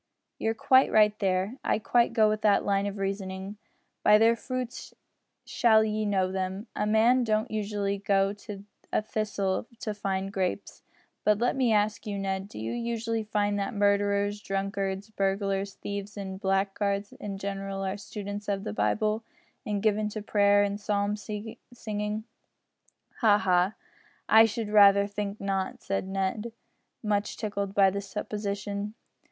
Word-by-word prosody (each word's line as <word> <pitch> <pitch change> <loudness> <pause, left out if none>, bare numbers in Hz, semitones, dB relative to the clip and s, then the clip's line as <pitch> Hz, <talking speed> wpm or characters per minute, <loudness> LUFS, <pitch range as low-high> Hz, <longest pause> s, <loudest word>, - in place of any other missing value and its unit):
"You're 225 0 0
quite 260 +4 +4
right 210 -1 +5
there. 195 +4 0
I - - +2
quite 235 +2 +2
go 220 -2 +4
with 215 0 0
that 205 -2 +3
line 200 0 +1
of 200 0 -5
reasoning. 195 0 -4 0.4
By 210 - +6
their 225 +2 +5
fruits 250 +1 -5 0.5
shall 220 -2 +4
ye 215 0 -1
know 190 -2 +1
them. 190 +2 -3
A 210 - 0
man 230 +4 +4
don't 215 +1 0
usually 205 -2 -2
go 195 0 +2
to 205 -1 -9 0.3
a - - +1
thistle 210 -2 -2
to 215 - -2
find 195 -1 -3
grapes. 190 +1 -3 0.4
But 210 -1 +4
let 240 +3 +1
me 255 -3 +2
ask 215 +1 +1
you, 205 -1 -3
Ned, 195 0 -2
do - - -12
you 110 +1 -3
usually 230 -1 -2
find 205 -1 0
that 200 +2 -3
murderers, 205 0 +1
drunkards, 195 +1 -3
burglars, 195 0 -1
thieves, 200 +1 -6
and 190 -1 -6
blackguards 200 +1 0
in 200 -1 -5
general 195 0 -4
are 190 +1 -2
students 205 0 -7
of 200 -1 -1
the - - -4
Bible 210 - 0 0.4
and 205 -1 -1
given 215 -1 +2
to 210 0 -6
prayer 205 -1 +4
and 205 +1 -2
psalm 205 0 0
singing?" 210 0 -5 1.0
"Ha! 215 -5 +5
ha! 185 0 +2 0.5
I 220 +1 +8
should 225 -1 -3
rather 200 -1 +7
think 205 0 -4
not," 195 -1 -2
said 195 -1 -2
Ned, 195 +4 -2 0.5
much 210 -1 -1
tickled 200 -2 -3
by 195 -1 +5
the 200 +1 -3
supposition. 205 +1 -4
205 Hz, 155 wpm, -28 LUFS, 195-215 Hz, 1.0 s, I